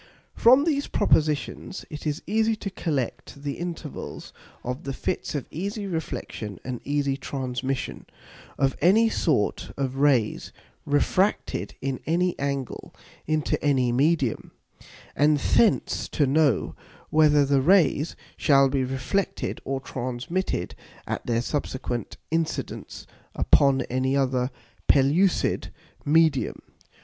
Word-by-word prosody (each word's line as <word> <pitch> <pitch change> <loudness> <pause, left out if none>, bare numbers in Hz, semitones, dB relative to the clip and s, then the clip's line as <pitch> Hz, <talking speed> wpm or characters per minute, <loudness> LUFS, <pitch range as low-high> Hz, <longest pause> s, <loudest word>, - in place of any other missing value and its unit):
From 255 +4 +6
these 290 -3 0
Propositions 155 +4 0
it 150 0 -5
is 150 0 -2
easy 220 +2 +2
to 200 -2 -6
collect 145 -4 -3
the 145 -1 -4
Intervals 170 -4 -6 0.3
of 125 +2 -4
the 135 - -4
Fits 175 - -3
of 140 - -2
easy 200 +6 -4
Reflexion 145 - -5
and 125 -2 -5
easy 140 -1 0
Transmission 130 -1 -4 0.5
of 135 -1 +1
any 215 +8 +5
sort 140 - 0
of 135 -1 -2
Rays 135 -6 +2 0.4
refracted 185 +7 +1
in 135 -1 -2
any 175 +2 +2
angle 140 -2 -4 0.3
into 155 -1 0
any 130 -4 +2
Medium; 140 -1 +1 0.7
and 150 +1 +4
thence 215 +9 +2
to 150 - +2
know, 140 -4 +2 0.4
whether 150 -2 +5
the 140 -1 +3
Rays 165 -1 +3 0.2
shall 135 -2 +4
be 135 0 0
reflected 135 +10 -2
or 135 0 -2
transmitted 130 +8 -3 0.3
at - - -4
their 115 0 +1
subsequent 125 -5 -3
Incidence 165 0 -3 0.3
upon 135 -1 +4
any 130 +2 0
other 130 -2 +1 0.4
pellucid 150 +8 +3 0.3
Medium. 155 -2 +2
145 Hz, 115 wpm, -25 LUFS, 130-165 Hz, 0.7 s, From